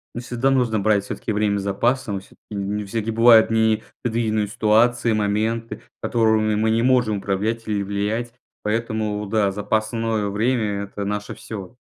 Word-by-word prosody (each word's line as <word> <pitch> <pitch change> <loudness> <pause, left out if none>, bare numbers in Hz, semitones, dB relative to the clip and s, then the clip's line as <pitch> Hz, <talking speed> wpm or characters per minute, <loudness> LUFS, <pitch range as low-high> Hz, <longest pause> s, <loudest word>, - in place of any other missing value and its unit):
Ну 120 - -4
всегда 125 +2 0
нужно 120 -5 +2
брать 100 -1 +2
всё-таки 110 - -4
время 105 -1 +1
с - - -5
запасом. 105 +1 0
Всё-таки 95 - -20 0.2
не 105 +1 -2
всякие 115 +2 -3
бывают 115 0 +6
непредвиденные 110 -1 0
ситуации, 115 +3 +2
моменты, 110 +2 -1 0.2
которыми 110 -2 +2
мы 110 +1 +1
не 115 +1 +2
можем 120 -5 +3
управлять 105 +4 -2
или 105 -2 0
влиять. 105 +4 -2 0.3
Поэтому 110 -1 -2
да, 100 -1 +1
запасное 110 +1 -1
время- 105 -2 0
это 100 0 -6
наше 105 0 -3
всё. 110 -2 -8
110 Hz, 145 wpm, -22 LUFS, 105-115 Hz, 0.3 s, бывают